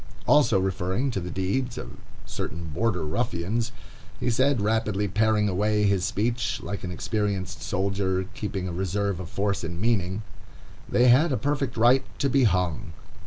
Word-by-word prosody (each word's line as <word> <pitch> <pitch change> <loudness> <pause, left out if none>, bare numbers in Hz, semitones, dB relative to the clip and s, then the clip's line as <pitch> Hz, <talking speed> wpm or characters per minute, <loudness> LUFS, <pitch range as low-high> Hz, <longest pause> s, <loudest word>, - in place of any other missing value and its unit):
Also 145 -9 +5
referring 95 +7 -1
to 100 - -2
the 90 -1 -5
deeds 100 +8 -1
of - - -6 0.3
certain 85 -1 -5
Border 100 -4 0
Ruffians, 110 +5 -1 0.5
he 125 - 0
said, 130 +2 +2
rapidly 105 -1 0
paring 105 +2 +2
away 105 +2 +1
his 100 -3 +2
speech, 115 +6 -1
like 100 - -5
an 90 - -3
experienced 95 -2 -2
soldier, 95 0 0
keeping 100 -6 -3
a 90 - -4
reserve 95 +1 -1
of 90 -2 -6
force 100 +1 -1
and 85 +1 -4
meaning, 100 -2 0 0.7
"They 125 +1 +4
had 145 +7 +5
a 130 - +1
perfect 135 -4 -1
right 120 +4 +5
to 140 - 0
be 135 -1 +4
hung." 90 -2 0
100 Hz, 160 wpm, -26 LUFS, 95-115 Hz, 0.7 s, Also